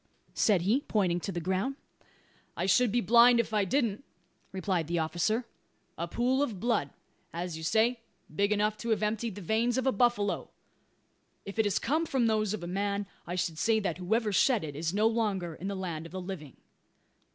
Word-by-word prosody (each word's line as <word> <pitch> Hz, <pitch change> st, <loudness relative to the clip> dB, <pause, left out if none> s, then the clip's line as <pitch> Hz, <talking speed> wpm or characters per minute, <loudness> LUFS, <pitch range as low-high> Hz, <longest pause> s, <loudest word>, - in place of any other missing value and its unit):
said 195 Hz, -6 st, +3 dB
he, 225 Hz, +9 st, +2 dB
pointing 185 Hz, -9 st, 0 dB
to 195 Hz, -, -4 dB
the 175 Hz, -, -3 dB
ground. 190 Hz, +10 st, -1 dB, 0.8 s
"I 175 Hz, -, 0 dB
should 220 Hz, +4 st, +4 dB
be 240 Hz, +2 st, +2 dB
blind 235 Hz, +3 st, +6 dB
if 235 Hz, -, -1 dB
I 210 Hz, -2 st, +2 dB
didn't," 235 Hz, 0 st, 0 dB, 0.5 s
replied 185 Hz, -4 st, -1 dB
the 170 Hz, +1 st, -1 dB
officer. 175 Hz, +9 st, 0 dB, 0.5 s
"A 170 Hz, -, -3 dB
pool 250 Hz, +8 st, +1 dB
of 230 Hz, -10 st, -2 dB
blood 230 Hz, -, 0 dB, 0.4 s
as 175 Hz, 0 st, -4 dB
you 160 Hz, -, -7 dB
say, 225 Hz, +8 st, +2 dB, 0.4 s
big 200 Hz, +4 st, +2 dB
enough 210 Hz, +1 st, +1 dB
to 235 Hz, -, -5 dB
have 215 Hz, -2 st, +1 dB
emptied 215 Hz, 0 st, -1 dB
the 205 Hz, -, -8 dB
veins 225 Hz, +6 st, +1 dB
of 260 Hz, -, 0 dB
a 265 Hz, -, +4 dB
buffalo. 225 Hz, -2 st, +1 dB, 1.0 s
If 200 Hz, +3 st, -7 dB
it 220 Hz, -, +4 dB
has 200 Hz, -, +1 dB
come 315 Hz, +6 st, 0 dB
from 260 Hz, -5 st, +1 dB
those 215 Hz, -2 st, +1 dB
of 215 Hz, -4 st, -4 dB
a -, -, -4 dB
man, 200 Hz, +2 st, -1 dB, 0.2 s
I 175 Hz, -, -3 dB
should 170 Hz, -3 st, -2 dB
say 225 Hz, -1 st, +3 dB
that 180 Hz, -4 st, -2 dB
whoever 215 Hz, +4 st, 0 dB
shed 240 Hz, 0 st, +3 dB
it 145 Hz, -2 st, -6 dB
is 160 Hz, +2 st, -2 dB
no 210 Hz, +3 st, +1 dB
longer 210 Hz, -7 st, 0 dB
in 180 Hz, +4 st, -7 dB
the 200 Hz, -, -3 dB
land 170 Hz, -4 st, -4 dB
of -, -, -16 dB
the 190 Hz, -, -4 dB
living." 180 Hz, -, -7 dB
205 Hz, 200 wpm, -30 LUFS, 180-230 Hz, 1.0 s, blind